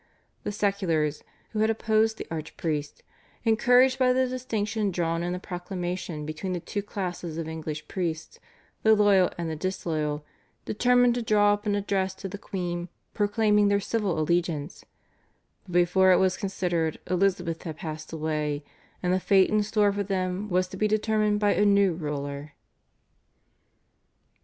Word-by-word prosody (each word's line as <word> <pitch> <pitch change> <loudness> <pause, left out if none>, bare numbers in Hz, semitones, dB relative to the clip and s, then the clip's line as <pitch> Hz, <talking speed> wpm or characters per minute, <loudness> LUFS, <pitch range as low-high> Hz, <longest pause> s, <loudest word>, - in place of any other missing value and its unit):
The - - -3
seculars, 185 -8 0 0.3
who 215 - -3
had 220 +1 +3
opposed 220 0 +2
the - - -6
archpriest, 155 -2 -4 0.4
encouraged 245 +4 +4
by 255 -1 +4
the 260 0 +2
distinction 220 -4 -2
drawn 170 -2 -1
in 175 +1 -2
the 180 - -2
proclamation 180 -3 -5
between 155 +5 -4
the 175 - -2
two 205 +4 -4
classes 180 -5 -5
of 165 -1 -3
English 155 -1 -5
priests, 165 -4 -4 0.4
the 220 0 +5
loyal 200 -3 +4
and 170 -1 -3
the 160 - -3
disloyal, 155 -4 -2 0.4
determined 245 +2 +3
to 245 - -2
draw 205 -2 +4
up 205 0 -4
an 205 - +2
address 195 -2 -1
to 195 - -6
the 200 +1 -7
queen 175 -3 -4 0.2
proclaiming 210 0 +3
their 200 0 +3
civil 205 -4 -1
allegiance, 165 -1 -1 0.8
but 180 - -9
before 180 +2 +4
it 180 - +6
was 185 -1 +2
considered 175 -5 -1
Elizabeth 180 -2 0
had 160 -3 -6
passed 155 -3 -6
away, 150 -2 -2 0.4
and 180 0 +2
the 185 - +2
fate 190 0 +4
in 215 0 +3
store 210 -1 +2
for 200 - -2
them 190 +1 -2
was 185 0 +1
to 190 - -8
be 215 - +2
determined 215 0 +1
by 205 -1 +3
a - - +2
new 200 -2 +4
ruler. 145 -2 -5
185 Hz, 155 wpm, -27 LUFS, 165-210 Hz, 0.8 s, it